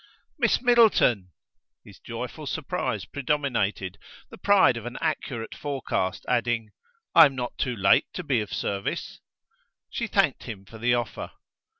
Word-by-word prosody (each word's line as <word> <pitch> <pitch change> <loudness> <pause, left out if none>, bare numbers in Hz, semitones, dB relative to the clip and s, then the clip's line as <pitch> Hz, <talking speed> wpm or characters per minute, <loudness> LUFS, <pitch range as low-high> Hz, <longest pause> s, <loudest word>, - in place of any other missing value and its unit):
"Miss 235 0 +2
Middleton!" 220 - +4 0.6
his - - -15
joyful - - -7
surprise - - -2
predominated; 125 -9 -1 0.3
the - - -10
pride 200 -11 +5
of 115 0 -6
an 120 - -6
accurate 135 -7 -3
forecast, 135 -10 -3
adding: 120 -3 0 0.4
"I 165 -2 +9
am 135 - -8
not 125 -1 -4
too 125 -2 -1
late 95 -2 +4
to 180 - -5
be 130 -7 +1
of 105 - -6
service?" 100 0 -3 0.7
She - - -2
thanked - - +1
him 100 -3 -8
for 110 +3 -12
the 120 +2 +2
offer. 120 -1 -4
120 Hz, 140 wpm, -26 LUFS, 110-145 Hz, 0.7 s, I